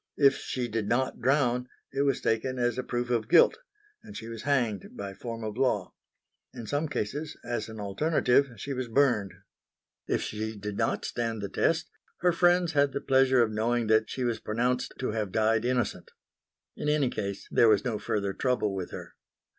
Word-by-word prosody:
If 140 -2 +5
she 125 -2 -3
did 110 -2 -2
not 130 +2 0
drown, 125 -2 +2 0.3
it 135 - 0
was 140 -2 +1
taken 130 +4 0
as 120 0 0
a - - -1
proof 120 0 -2
of 115 -3 0
guilt; - - +6 0.4
and 215 -2 -10
she 115 - -7
was 115 -2 -7
hanged 120 -8 -1
by 100 -1 -5
form 115 +3 -6
of 110 +1 -5
law. 125 -8 0 0.6
In 115 - -7
some 145 +6 -1
cases, 145 +3 -4
as 120 -2 -3
an 110 -1 -8
alternative, 130 +5 +2
she 140 +8 -4
was 130 -1 -3
burned. 115 -6 +2 0.8
If - - 0
she 110 0 -4
did 105 0 -5
not - - 0
stand 115 -2 -2
the 100 - -3
test 165 - +1 0.3
her 180 0 +4
friends 175 0 +3
had 145 -3 +2
the - - -1
pleasure 130 -2 +4
of 110 - -1
knowing 115 +2 0
that 110 0 +3
she 130 - -3
was 120 -2 0
pronounced 125 +3 -1
to 130 - -2
have 105 -3 -2
died 110 +2 +2
innocent. 125 -3 -1 0.7
In 150 - -2
any 145 -4 +2
case 100 -1 -4
there 115 - +5
was 105 -2 +3
no 115 -4 -1
further 100 -2 -1
trouble 125 -4 0
with 95 -2 -4
her. - - -9
120 Hz, 190 wpm, -28 LUFS, 110-135 Hz, 0.8 s, guilt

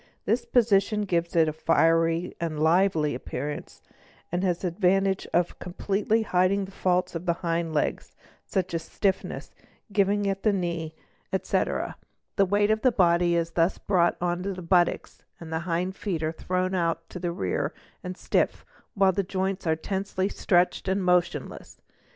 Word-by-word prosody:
This 235 +3 0
position 215 -3 +3
gives 170 -4 -1
it 165 -1 +5
a 155 - -1
fiery 165 +2 +2
and 160 -3 -2
lively 160 -2 +3
appearance 145 +4 -6 0.5
and 175 +2 -1
has 180 -3 +1
the 180 - 0
advantage 190 +2 +1
of 175 0 0
completely 200 +4 0
hiding" 190 0 +2
the 190 - -12
faults 180 -1 0
of 170 +1 -6
the 170 - +3
hind 165 -1 0
legs, 150 - -2 0.3
such 185 -3 -2
as 165 - -1
stiffness, 190 +3 -2 0.4
giving 200 0 +2
at 195 0 -1
the 215 - +2
knee, 170 -4 -3 0.4
etc. - - -1 0.4
The 195 - +3
weight 205 +2 +2
of 220 0 +1
the 255 - +4
body 175 -3 +3
is 165 0 0
thus 170 +2 +1
brought 175 -4 +2
on 175 0 -1
to 195 +1 -3
the 185 -1 -8
buttocks, 175 0 +1 0.2
the 160 -1 -4
hind 180 +3 -1
feet 175 -7 -3
are 155 - 0
thrown 185 +3 -2
out 165 -2 -1
to 180 - -7
the 175 -1 -2
rear 95 - -2 0.3
and 180 0 -6
stiff, - - 0 0.3
while 195 -1 +4
the 195 +2 0
joints 190 0 -2
are 160 - +3
tensely 190 +3 -2
stretched 180 -1 +1
and 190 +1 0
motionless. 180 -1 -1
180 Hz, 165 wpm, -26 LUFS, 170-195 Hz, 0.5 s, it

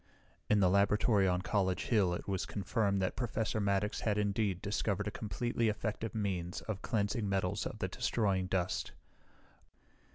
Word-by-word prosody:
In 105 -1 +4
the 95 - +5
laboratory 100 +1 +3
on 90 0 +1
College 95 -1 +1
Hill 100 -7 +2
it - - -7
was 95 -2 -1
confirmed 100 -1 0
that 95 - -1
Professor 115 -2 -1
Maddox 100 +1 0
had 105 -2 0
indeed 100 -2 0
discovered 105 0 -1
a - - -1
completely 115 +3 -1
effective 110 +1 -3
means 95 -4 -2
of 105 -3 -5
cleansing 105 -1 0
metals 95 -2 0
of - - -7
the - - -1
destroying 95 -5 0
dust. 90 -2 -1
100 Hz, 155 wpm, -33 LUFS, 95-110 Hz, -, the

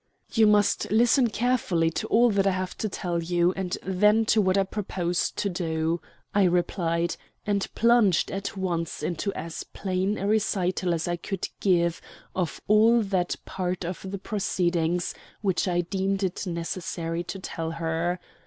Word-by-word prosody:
"You 225 -2 +5
must 210 -1 +3
listen 240 +4 +4
carefully 215 -9 +1
to - - -3
all 235 0 +4
I 195 0 +4
have 185 -1 -2
to 215 - -1
tell 175 -3 -2
you, 175 +1 +2
and 185 -2 -3
then 210 +4 +3
to 215 - +4
what 190 -1 +2
I 195 - +4
propose 185 -3 -1
to - - -2
do," 165 -2 -1 0.3
I 200 -1 +4
replied, 170 -1 0 0.3
and 200 -2 0
plunged 230 -6 +4
at 195 0 -4
once 170 -3 -2
into 180 +4 -1
as 165 0 -5
plain 190 +1 -2
a 195 - -3
recital 185 -4 +1
as 165 - -3
I 175 0 -1
could 190 +2 -4
give 170 -3 +2 0.3
of 180 -3 -2
all 225 +2 +5
that 185 -3 0
part 180 -1 -3
of 185 +2 -5
the 200 - -4
proceedings 175 -4 0 0.3
which 190 -2 +1
I 175 -1 +2
deemed 195 +2 -1
it 190 +1 -2
necessary 170 0 -3
to 195 - -5
tell 165 -3 -4
her. 165 +2 -1
185 Hz, 160 wpm, -26 LUFS, 170-200 Hz, 0.3 s, You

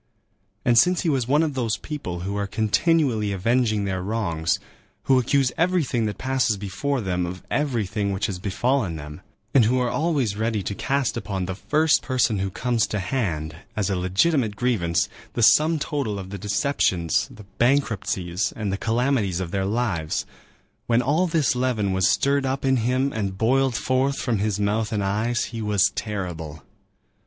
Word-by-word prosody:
And 120 -2 +5
since 180 +5 +3
he 170 - 0
was 130 -5 0
one 145 +4 +3
of 155 -3 -1
those 120 -5 -1
people 90 - -5
who 100 +3 -3
are 100 0 -1
continually 110 - +1
avenging 110 +1 +1
their 95 -1 -2
wrongs, 90 -6 -1 0.5
who 130 -1 +4
accuse 130 +1 +2
everything 160 -10 +1
that 105 -2 -4
passes 130 -5 0
before 110 +8 -2
them 90 -3 -1
of 90 +1 -7
everything 105 -8 -1
which 95 0 -1
has 95 -3 -3
befallen 105 0 0
them, 75 -1 -8 0.3
and 130 -5 +6
who 125 +4 +2
are 125 -1 0
always 145 -10 0
ready 110 -1 -1
to 100 - -3
cast 135 +4 -1
upon 95 -3 -3
the 95 - -3
first 150 - +2
person 125 -5 +1
who 95 0 -1
comes 115 +3 0
to 105 - -3
hand, 90 - -2 0.2
as 105 -2 0
a - - +1
legitimate 105 - +1
grievance, 100 -8 +1 0.3
the 120 - 0
sum 155 +7 +5
total 140 -8 -2
of 95 -1 -7
the 100 - -6
deceptions, 100 - +1
the 105 - -13
bankruptcies, 105 -7 0
and 105 -3 -2
the - - -1
calamities 115 -5 0
of 90 -3 -4
their 95 -1 -1
lives,—when 110 +3 -3
all 155 +8 +2
this 160 -6 +1
leaven 120 -6 0
was 95 +1 +3
stirred 140 0 +2
up 135 +1 -2
in 130 -1 +3
him 130 +4 0
and 100 -3 -3
boiled 130 +3 +2
forth 130 +3 +1
from 115 -5 -1
his 105 0 -1
mouth 105 +2 0
and 105 -2 -1
eyes, 110 +5 0
he 115 - -4
was 105 -3 +2
terrible. 85 -8 -5
110 Hz, 175 wpm, -24 LUFS, 95-130 Hz, 0.5 s, and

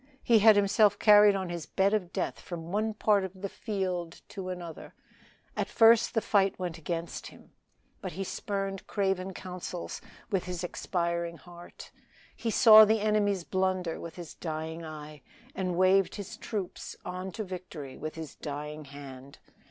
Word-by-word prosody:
He 230 -2 +5
had 215 0 +7
himself 205 0 +4
carried 210 -1 +7
on 190 -2 -3
his 170 -2 -5
bed 195 +1 +2
of 185 -5 -1
death 190 - -3
from 170 -1 -7
one 215 +2 0
part 210 -2 +3
of 190 0 -7
the - - 0
field 185 -6 -4
to 190 -3 -6
another; 175 -3 -7 0.6
at - - -1
first 230 +1 +5
the 225 - +3
fight 195 -2 +2
went 175 -3 -4
against 165 +1 -4
him, - - -16 0.5
but - - -5
he 195 +4 -3
spurned 195 0 -4
craven 190 -1 -1
counsels 180 -1 -6 0.3
with 190 -3 0
his 180 -1 -4
expiring 170 -1 -2
heart; 175 0 -13 0.4
he 230 - -3
saw 220 -1 +9
the 215 +1 +3
enemy's 205 -3 +1
blunder 185 -2 -1
with 170 - -8
his 175 -3 -8
dying 160 0 -5
eye, 155 -2 -9 0.3
and 185 -2 -2
waved 185 +1 +4
his 205 -2 -7
troops 200 -5 -5
on 185 +1 -5
to 220 - -4
victory 180 -8 -8
with 155 0 -6
his 160 -3 -7
dying 150 +1 -6
hand. 140 -1 -11
185 Hz, 160 wpm, -29 LUFS, 170-200 Hz, 0.6 s, saw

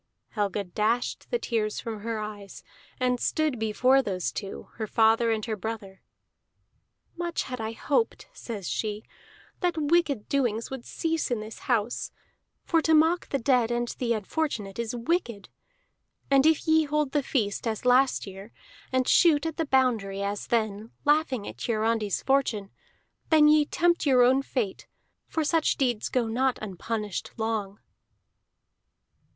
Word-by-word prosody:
Helga 205 -1 -1
dashed 215 +6 -1
the 485 - +1
tears 215 - -2
from 225 -2 -5
her 225 +1 -3
eyes, 210 -2 -7 0.4
and 250 -1 +1
stood 305 -4 0
before 250 +5 +3
those 185 -7 -2
two, 200 -2 -7
her 220 -1 -3
father 225 +2 +3
and 220 -2 0
her 220 - -2
brother. 205 -2 -6 1.1
"Much 345 -1 -2
had 250 -3 -6
I 220 +1 -3
hoped," 295 - -1
says 210 -6 -6
she, 215 0 -2 0.6
"that 350 -3 0
wicked 300 -6 +1
doings 240 -5 0
would 265 -3 -6
cease 325 -2 -2
in 240 -3 0
this 215 +1 -8
house 235 -1 0 0.5
for 330 -2 +2
to 320 0 +3
mock 325 +3 +3
the 275 - 0
dead 250 -2 +2
and 240 0 -1
the 235 -2 +1
unfortunate 215 -2 -3
is 235 0 -2
wicked. 235 - -2 0.8
And 275 +2 +5
if 320 0 +2
ye 315 0 +4
hold 300 -1 0
the 290 - +1
feast 230 -5 -1
as 220 +1 -3
last 255 +2 +4
year, 195 +2 -10 0.4
and 260 -1 +1
shoot 320 -4 +5
at 325 -2 -3
the 325 -2 -1
boundary 225 -8 +1
as 200 +1 -3
then, 215 -2 -1 0.2
laughing 290 -7 +2
at 120 +3 -9
Hiarandi's 220 -2 0
fortune, 250 -7 +1 0.6
then 310 -2 +6
ye 300 0 +5
tempt 345 0 +1
your 255 -3 +6
own 260 +2 +4
fate, 240 -7 -3 0.4
for 320 - -1
such 320 +1 +1
deeds 245 -5 0
go 250 -2 +1
not 255 +3 +1
unpunished 210 0 -4
long." 220 -3 -2
235 Hz, 150 wpm, -27 LUFS, 215-285 Hz, 1.1 s, then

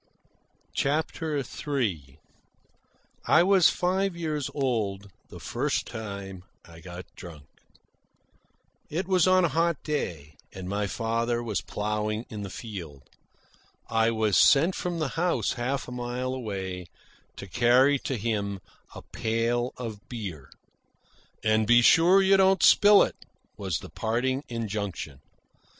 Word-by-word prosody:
CHAPTER 155 +1 -1
III 120 - -3 1.1
I - - +6
was 190 -2 +5
five 190 +1 0
years 155 -4 -3
old 105 -8 -2 0.2
the - - -10
first - - -2
time 100 -4 -7 0.2
I 85 -1 -14
got 90 +2 -9
drunk. 80 -6 -11 1.4
It 175 +4 -3
was 185 -2 +3
on 185 -1 +5
a - - +1
hot 165 +2 0
day, 80 - -4 0.2
and 95 -1 -7
my 100 +1 -1
father 115 +2 -1
was 110 -4 -2
ploughing 105 +2 -3
in 105 -2 -6
the 100 - -5
field. 85 - -8 0.9
I 115 0 +3
was 110 -3 +1
sent 165 +6 +5
from 175 -1 -3
the 155 -4 -1
house, 170 +5 0
half 130 +2 -3
a - - -8
mile 125 +1 -3
away, 95 -7 -5 0.5
to - - -8
carry 125 +7 +3
to 130 - -3
him 100 -3 -2 0.4
a - - -9
pail 115 +2 -1
of 115 -3 -7
beer. 90 - -7 0.9
"And 110 0 +2
be 120 +1 +6
sure 180 +8 +6
you 195 0 +5
don't 190 -1 +4
spill 205 0 +7
it," - - -4 0.4
was 95 -5 -2
the - - -10
parting 125 +5 -1
injunction. 100 - -4
115 Hz, 130 wpm, -27 LUFS, 100-145 Hz, 1.4 s, spill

